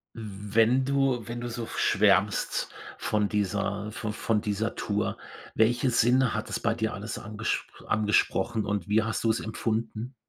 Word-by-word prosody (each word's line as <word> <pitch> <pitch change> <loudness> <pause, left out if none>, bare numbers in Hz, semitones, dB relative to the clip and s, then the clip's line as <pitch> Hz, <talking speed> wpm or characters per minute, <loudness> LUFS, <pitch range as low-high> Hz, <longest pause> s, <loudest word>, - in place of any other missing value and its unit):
Wenn 110 +4 +1
du 135 -4 +1
wenn 120 +1 -5
du 120 - -4
so 115 -1 -5
schwärmst - - +2 0.3
von 105 -2 0
dieser 100 0 -1
vo 105 -1 -4
von 105 0 0
dieser 105 +2 -1
Tour, 105 0 -1 0.4
welche 120 +3 +3
Sinne 125 +1 +4
hat 105 - -3
es - - -2
bei 115 0 +1
dir 110 -1 -1
alles 105 +4 -5
angespr 110 +1 -4
angesprochen 105 0 +2
und 100 -3 -2
wie 105 +1 +3
hast 115 0 -2
du's 110 0 +3
empfunden? 110 +2 -3
110 Hz, 150 wpm, -28 LUFS, 105-115 Hz, 0.4 s, Sinne